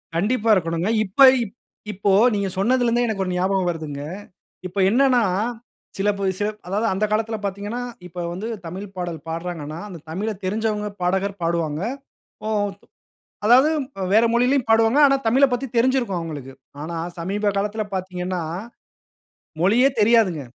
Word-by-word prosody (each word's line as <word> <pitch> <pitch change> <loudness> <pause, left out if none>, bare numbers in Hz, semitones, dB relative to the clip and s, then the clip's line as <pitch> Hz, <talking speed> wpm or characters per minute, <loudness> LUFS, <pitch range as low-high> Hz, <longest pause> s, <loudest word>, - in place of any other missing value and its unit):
கண்டிப்பா 220 +5 +1
இருக்கணுங்க. 165 +2 -1 0.2
இப்ப 190 +8 -15 0.7
இப்போ 200 0 0 0.2
நீங்க 200 -1 0
சொன்னதில 245 +5 +2
இருந்தே 240 +1 +2
எனக்கு 195 -3 -1
ஒரு 185 - -3
ஞாபகம் 185 0 +1
வருதுங்க. 155 -4 -5 0.7
இப்ப 185 +3 -13
என்னன்னா 250 0 +4 0.7
சில 200 +2 +1
பே 200 - -2 0.4
அதாவது 205 +4 -1
அந்த 200 +3 +1
காலத்தில 220 +1 0
பார்த்தீங்கன்னா, 205 +5 -3 0.3
இப்போ 180 +1 -9
வந்து 205 +5 -5 0.2
தமிழ் 185 +5 -6
பாடல் 175 -2 -3
பாடுறாங்கன்னா, 165 -2 -5
அந்த 180 -4 -8
தமிழ 200 +7 -2
தெரிஞ்சவங்க 210 +1 -1
பாடகர் 190 +2 0
பாடுவாங்க. 165 -2 -1 0.6
ஓ, - - -2 1.0
அதாவது 255 +7 +6 0.4
வேற 225 +2 +6
மொழியிலும் 250 +1 +2
பாடுவாங்க. 225 +5 +4
ஆனா 275 0 +3
தமிழ 265 +5 +5
பத்தி 255 +2 -1
தெரிஞ்சிருக்கும் 240 -7 +2
அவங்களுக்கு. 145 -5 -7 0.3
ஆனா 170 +1 -5 0.2
சமீப 200 +4 -1
காலத்தில 210 +2 -1
பார்த்தீங்கன்னா, 180 -1 -3 1.2
மொழியே 235 +8 +5
தெரியாதுங்க. 205 - +3
200 Hz, 130 wpm, -22 LUFS, 180-225 Hz, 1.2 s, அதாவது